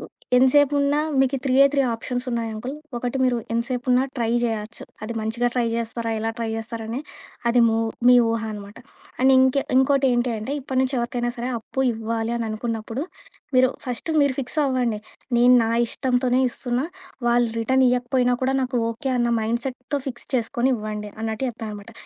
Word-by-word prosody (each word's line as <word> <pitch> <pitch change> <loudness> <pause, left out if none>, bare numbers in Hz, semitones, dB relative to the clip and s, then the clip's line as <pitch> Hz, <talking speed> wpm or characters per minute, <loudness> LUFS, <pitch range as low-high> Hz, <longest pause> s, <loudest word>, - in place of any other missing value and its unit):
హ్మ్, - - -9 0.3
ఎంతసేపున్నా 285 +2 +4 0.2
మీకు 270 +1 +2
త్రీయే, 270 +1 +5
three 280 -1 +3
ఆప్షన్సున్నాయి 235 -1 -3
uncle. 250 +6 -5 0.2
ఒకటి 245 +2 -2
మీరు 250 -1 +2 0.2
ఎంతసేపున్నా 250 +1 +1
ట్రై 230 -2 0
చేయొచ్చు. 225 -1 -3 0.2
అది 215 +2 -4
మంచిగా 235 +3 0
ట్రై 245 -2 +2
చేస్తారా, 230 0 -3
ఎలా 225 +1 -1
ట్రై 230 -1 -2
చేస్తారని 225 +2 -4 0.5
అది 240 +1 +4
ము 225 - +1 0.3
మీ 250 - +8
ఊహ 225 0 -1
అనమాట. 205 0 -9 0.4
అండ్ 265 +1 +5
ఇంక్ 260 +1 +4 0.2
ఇంకోటేంటి 260 -2 +3
అంటే 220 +6 -4
ఇప్పటి 260 0 -3
నుంచి 265 +1 -1
ఎవరికైనా 240 0 -1
సరే 240 +2 -3
అప్పు 265 +4 -3
ఇవ్వాలి 225 +1 -2
అననుకున్నప్పుడు, 225 +3 -3 0.5
మీరు 255 0 +5 0.2
ఫస్ట్ 250 +6 -3
మీరు 280 -2 +2
ఫిక్స్ 275 +4 -4
అవ్వండి. 245 -5 0 0.4
నేను 245 +1 +6
నా 225 - -1 0.2
ఇష్టంతోనే 255 0 +1
ఇస్తున్నా. 245 +3 -2 0.4
వాళ్ళు 240 0 +3
రిటర్న్ 260 +3 +3
ఇవ్వకపోయినా 250 0 +1
కూడా 265 +1 +1
నాకు 250 -1 -1
ఓకే, 265 +4 -4
అన్న 240 0 +2
మైండ్‍సెట్‍తో 250 +5 -2
ఫిక్స్ 240 -2 -8
చేసుకొని 245 +2 0
ఇవ్వండి. 210 -1 -5
అన్నట్టు 220 +3 -2
చెప్పా 230 -1 -9
అనమాట. 205 -1 -9
245 Hz, 160 wpm, -23 LUFS, 225-260 Hz, 0.5 s, మీ